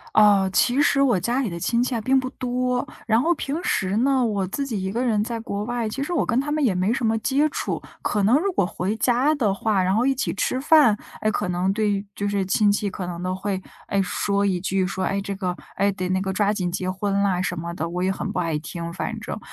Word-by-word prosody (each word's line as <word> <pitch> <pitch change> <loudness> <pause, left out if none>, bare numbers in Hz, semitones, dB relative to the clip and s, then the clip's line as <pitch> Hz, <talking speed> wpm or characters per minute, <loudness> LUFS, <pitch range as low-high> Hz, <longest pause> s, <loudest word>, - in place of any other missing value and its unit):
呃， 205 -3 +5
其 250 +7 +3
实 275 -1 +3
我 245 -8 +4
家 240 +8 0
里 245 - -1
的 170 - -5
亲 235 +6 +1
戚 250 0 0
啊， 225 - -1
并 265 +4 +3
不 255 0 -3
多， 250 0 -1 0.2
然 225 +1 +4
后 335 +5 +3
平 305 +1 -3
时 195 - 0
呢， 265 +2 +3
我 205 -4 0
自 275 +9 -3
己 220 -7 -3
一 190 - -2
个 240 +5 -1
人 215 -3 +2
在 230 +1 -4
国 205 -2 -4
外， 240 0 -2
其 275 +6 -3
实 355 - -5
我 340 - +1
跟 235 - 0
他 295 +2 -4
们 305 0 +1
也 220 -8 +2
没 185 +5 +1
什 250 -3 -1
么 225 0 +2
接 275 +6 +2
触， - - -3 0.2
可 210 - 0
能 230 +8 +5
如 390 +5 0
果 270 - +1
回 190 +2 -2
家 255 +6 +3
的 215 -9 +1
话， 200 -1 +1
然 185 +1 +1
后 235 +4 +2
一 270 - +3
起 265 - -2
吃 255 - -1
饭， 290 -7 +5 0.2
哎， 215 - +2
可 205 - -1
能 180 +2 +1
对 205 -1 0
就 205 +1 -3
是 200 -1 0
亲 205 +2 +3
戚 205 0 +1
可 185 -1 -5
能 175 0 -5
都 185 0 -1
会， 190 0 -3 0.3
哎， 200 - +1
说 200 +2 0
一 185 -3 +1
句， 190 +1 0
说： 185 0 -3
“哎， 195 0 -1
这 200 0 -4
个 185 -2 -2 0.2
哎， 200 - +2
得 185 -1 -3
那 185 - +1
个 190 0 -2
抓 205 +1 +2
紧 185 -4 -1
结 185 +1 -2
婚 195 +1 -2
啦。” 190 -3 +1
什 180 -1 -2
么 170 +1 -4
的， 165 -1 -3
我 180 +1 -2
也 190 - +2
很 - - -4
不 - - -1
爱 165 -4 -1
听， 170 +2 -6
反 225 +6 -4
正。 210 - -5
205 Hz, 285 characters per minute, -23 LUFS, 190-245 Hz, 0.3 s, 呃